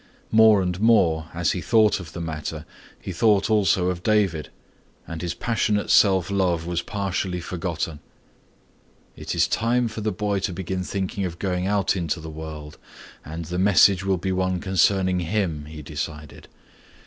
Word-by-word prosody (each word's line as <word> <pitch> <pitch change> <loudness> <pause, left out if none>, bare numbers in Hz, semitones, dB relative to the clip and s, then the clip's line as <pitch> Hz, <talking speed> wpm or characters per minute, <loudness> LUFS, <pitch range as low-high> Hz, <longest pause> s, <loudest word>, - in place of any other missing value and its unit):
More 110 -3 +6
and 90 0 -2
more 85 -8 +3
as 85 -1 0
he 90 - -3
thought 110 0 +3
of 85 -3 -10
the - - -6
matter, 80 -3 -5 0.3
he - - -6
thought 105 +3 +2
also 95 -4 +3
of 90 -1 -3
David 95 -7 +1 0.6
and 80 -1 -7
his 85 -1 -3
passionate 105 -1 0
self 95 -2 +4
love 90 -4 0
was 85 -1 -2
partially 95 -2 -3
forgotten. 85 -3 -4 1.2
"It - - -5
is - - +3
time 120 +2 +1
for 110 0 -6
the 110 0 -1
boy 105 -2 -1
to 95 -1 -3
begin 95 +1 -4
thinking 95 +1 -3
of 85 -2 -4
going 90 -1 -2
out 100 -1 +1
into 85 -2 -2
the 80 0 -8
world 75 -1 -8 0.4
and 80 +2 -7
the 90 +3 -3
message 95 0 +5
will 95 -1 +1
be 95 +2 -3
one 95 -1 0
concerning 95 0 +2
him," 85 -4 -2
he 75 0 -9
decided. 75 0 -7
90 Hz, 165 wpm, -23 LUFS, 85-100 Hz, 1.2 s, More